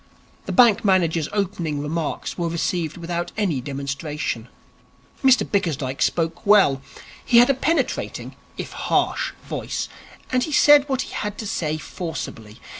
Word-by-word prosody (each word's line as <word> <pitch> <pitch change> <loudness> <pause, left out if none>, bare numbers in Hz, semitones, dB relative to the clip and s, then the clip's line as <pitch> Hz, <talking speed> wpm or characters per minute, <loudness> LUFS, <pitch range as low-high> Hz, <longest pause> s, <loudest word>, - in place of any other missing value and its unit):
The - - -2
bank 240 -5 +5
manager's 170 -6 +2
opening 175 -7 -2
remarks 150 +2 -3
were 170 -2 -1
received 170 -1 -2
without 170 0 -3
any 180 -11 0
demonstration. 140 -2 -4 0.8
Mr 265 -1 +5
Bickersdyke 145 -9 -1
spoke 165 0 0
well. 200 -11 +5 0.4
He 240 - +4
had 245 +3 +7
a - - +2
penetrating, 315 +5 -1 0.2
if - - -5
harsh, - - 0
voice, - - -4 0.4
and 255 -1 +2
he 310 - -2
said 290 0 +6
what 265 -1 0
he - - -10
had 210 -1 -4
to 220 - -5
say 155 -6 -2
forcibly. 135 - -7
170 Hz, 140 wpm, -22 LUFS, 150-210 Hz, 0.8 s, had